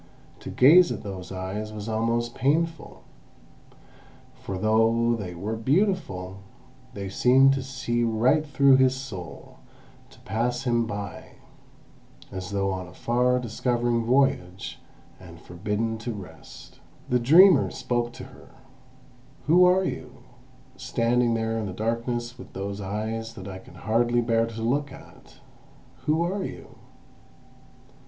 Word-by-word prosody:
To -, -, -8 dB
gaze 170 Hz, +7 st, +6 dB
at -, -, -5 dB
those 95 Hz, -3 st, -7 dB
eyes 95 Hz, +3 st, -5 dB
was 105 Hz, 0 st, -7 dB
almost 115 Hz, +2 st, -1 dB
painful; 160 Hz, +4 st, -1 dB, 1.3 s
for 95 Hz, -, -7 dB
though 115 Hz, +3 st, +2 dB
they 95 Hz, -6 st, -6 dB
were 105 Hz, +6 st, -4 dB
beautiful, 115 Hz, -, -1 dB, 0.6 s
they 100 Hz, -1 st, -5 dB
seemed 130 Hz, +7 st, +4 dB
to 135 Hz, -, -2 dB
see 130 Hz, -3 st, -3 dB
right 120 Hz, +7 st, +2 dB
through 140 Hz, -2 st, +4 dB
his 130 Hz, 0 st, +3 dB
soul, 110 Hz, -10 st, -9 dB, 0.5 s
to -, -, -19 dB
pass 120 Hz, +5 st, -2 dB
him 120 Hz, -2 st, +1 dB
by, 100 Hz, -3 st, -7 dB, 1.0 s
as 95 Hz, -1 st, -6 dB
though 100 Hz, -1 st, -1 dB
on 95 Hz, -1 st, -5 dB
a -, -, -15 dB
far 125 Hz, +1 st, +1 dB
discovering 120 Hz, 0 st, -1 dB
voyage, 115 Hz, -8 st, 0 dB, 0.4 s
and 85 Hz, -2 st, -13 dB
forbidden 105 Hz, +6 st, -3 dB
to 120 Hz, +1 st, -4 dB
rest. 100 Hz, -3 st, -12 dB, 0.3 s
The 125 Hz, -, +2 dB
dreamer 165 Hz, +6 st, +6 dB
spoke 120 Hz, -1 st, -2 dB
to -, -, -9 dB
her: -, -, -15 dB, 0.9 s
"Who 175 Hz, +4 st, +6 dB
are 185 Hz, +1 st, +4 dB
you, -, -, -6 dB, 0.5 s
standing 120 Hz, -1 st, +1 dB
there 115 Hz, 0 st, -1 dB
in 110 Hz, -, -3 dB
the 95 Hz, -, -6 dB
darkness 120 Hz, +3 st, -3 dB
with -, -, -12 dB
those 100 Hz, +1 st, -5 dB
eyes 110 Hz, +3 st, -4 dB
that 95 Hz, -, -9 dB
I 95 Hz, -1 st, -7 dB
can -, -, -16 dB
hardly 120 Hz, +2 st, +1 dB
bear 115 Hz, -1 st, +1 dB
to 115 Hz, -1 st, -6 dB
look 140 Hz, +4 st, 0 dB
at? -, -, -15 dB, 0.7 s
Who 155 Hz, +2 st, +2 dB
are 190 Hz, +3 st, -2 dB
you?" -, -, -9 dB
115 Hz, 135 wpm, -25 LUFS, 105-130 Hz, 1.3 s, gaze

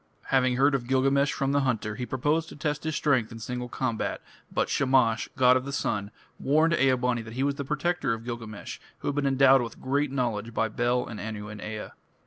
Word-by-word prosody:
Having 130 Hz, -2 st, +3 dB
heard 140 Hz, +2 st, +4 dB
of 125 Hz, -3 st, -1 dB
Gilgamesh 135 Hz, +2 st, +3 dB
from 135 Hz, 0 st, -1 dB
the 140 Hz, -, +3 dB
hunter, 115 Hz, -6 st, -1 dB
he 125 Hz, +3 st, -5 dB
proposed 150 Hz, +5 st, 0 dB
to -, -, -10 dB
test 150 Hz, 0 st, -3 dB
his 155 Hz, -1 st, -1 dB
strength 130 Hz, -7 st, +1 dB
in 115 Hz, -, -8 dB
single 125 Hz, +2 st, -5 dB
combat, 120 Hz, -3 st, -2 dB, 0.3 s
but -, -, 0 dB
Shamash, 130 Hz, -5 st, +2 dB
god 125 Hz, -1 st, +5 dB
of 130 Hz, -, +1 dB
the 140 Hz, -, -5 dB
sun, 105 Hz, -6 st, -1 dB, 0.3 s
warned 155 Hz, +4 st, +3 dB
Ea 135 Hz, -5 st, +4 dB
bani 125 Hz, -1 st, 0 dB
that 115 Hz, 0 st, -9 dB
he 130 Hz, -, 0 dB
was 140 Hz, 0 st, +1 dB
the 140 Hz, 0 st, -5 dB
protector 150 Hz, -1 st, 0 dB
of 115 Hz, 0 st, -3 dB
Gilgamesh, 115 Hz, -3 st, -6 dB, 0.2 s
who -, -, -1 dB
had -, -, -1 dB
been 145 Hz, 0 st, 0 dB
endowed 135 Hz, -1 st, +5 dB
with 115 Hz, -1 st, -6 dB
great 140 Hz, +2 st, 0 dB
knowledge 115 Hz, -4 st, -2 dB
by 115 Hz, -, +1 dB
Bel 120 Hz, +2 st, 0 dB
and 110 Hz, -, -7 dB
Anu 105 Hz, -1 st, -5 dB
and 105 Hz, -1 st, -8 dB
Ea. 110 Hz, 0 st, -5 dB
130 Hz, 220 wpm, -27 LUFS, 115-140 Hz, 0.3 s, god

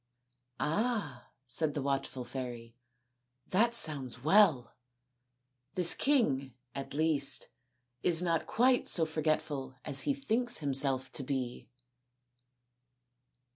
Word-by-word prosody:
" 125 Hz, 0 st, -53 dB
Ah," 200 Hz, -, -2 dB, 0.2 s
said 150 Hz, +4 st, -1 dB
the 145 Hz, -, -2 dB
watchful 135 Hz, -2 st, -3 dB
fairy, 120 Hz, -2 st, -8 dB, 0.4 s
" 125 Hz, 0 st, -50 dB
that 230 Hz, +5 st, +2 dB
sounds 135 Hz, -, +4 dB
well 160 Hz, -, +3 dB, 1.0 s
This 180 Hz, -2 st, +4 dB
king, 140 Hz, -, 0 dB, 0.2 s
at 135 Hz, 0 st, -7 dB
least, 155 Hz, -2 st, +1 dB, 0.5 s
is 170 Hz, -2 st, +3 dB
not 170 Hz, -2 st, -1 dB
quite 250 Hz, +2 st, +2 dB
so 165 Hz, -, +3 dB
forgetful 155 Hz, -4 st, -3 dB
as 135 Hz, -, 0 dB
he 280 Hz, -, -1 dB
thinks 245 Hz, -3 st, -1 dB
himself 135 Hz, -2 st, +2 dB
to -, -, -3 dB
be." 130 Hz, -4 st, -5 dB
145 Hz, 110 wpm, -31 LUFS, 130-180 Hz, 1.0 s, sounds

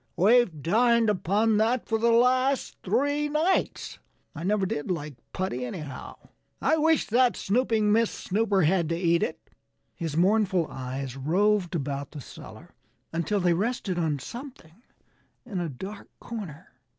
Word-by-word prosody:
"We've 195 Hz, -, +3 dB
dined 230 Hz, +4 st, +3 dB
upon 210 Hz, +3 st, +1 dB
that 230 Hz, +3 st, +1 dB
for 225 Hz, -1 st, 0 dB
the 235 Hz, +1 st, +3 dB
last 255 Hz, +3 st, +2 dB
three 290 Hz, +2 st, 0 dB
nights. 315 Hz, +6 st, 0 dB, 0.3 s
And -, -, -8 dB
I -, -, -5 dB
never 200 Hz, +1 st, +1 dB
did 145 Hz, -4 st, -3 dB
like 150 Hz, -4 st, -3 dB, 0.2 s
putty, 180 Hz, -10 st, -3 dB
anyhow. 140 Hz, +1 st, -7 dB, 0.4 s
I 315 Hz, -, +2 dB
wish 320 Hz, 0 st, +3 dB
that 245 Hz, +2 st, +3 dB
snooping 220 Hz, -1 st, +1 dB
Miss 230 Hz, +1 st, +3 dB
Snooper 200 Hz, -1 st, 0 dB
had 170 Hz, 0 st, +2 dB
to 165 Hz, -, 0 dB
eat 170 Hz, -1 st, +2 dB
it." -, -, -4 dB, 0.4 s
His 160 Hz, -2 st, -4 dB
mournful 190 Hz, -1 st, +3 dB
eyes 130 Hz, 0 st, -5 dB
roved 180 Hz, +6 st, +1 dB
about 140 Hz, -2 st, -3 dB
the 150 Hz, -, -7 dB
cellar 130 Hz, -, -12 dB, 0.4 s
until 170 Hz, +5 st, 0 dB
they 175 Hz, -2 st, +3 dB
rested 195 Hz, -1 st, -1 dB
on 155 Hz, -3 st, 0 dB
something 230 Hz, -, -10 dB, 0.6 s
in 205 Hz, -7 st, -4 dB
a 170 Hz, -2 st, -2 dB
dark 190 Hz, +10 st, -8 dB
corner. 190 Hz, -7 st, -8 dB
195 Hz, 150 wpm, -27 LUFS, 165-230 Hz, 0.6 s, We've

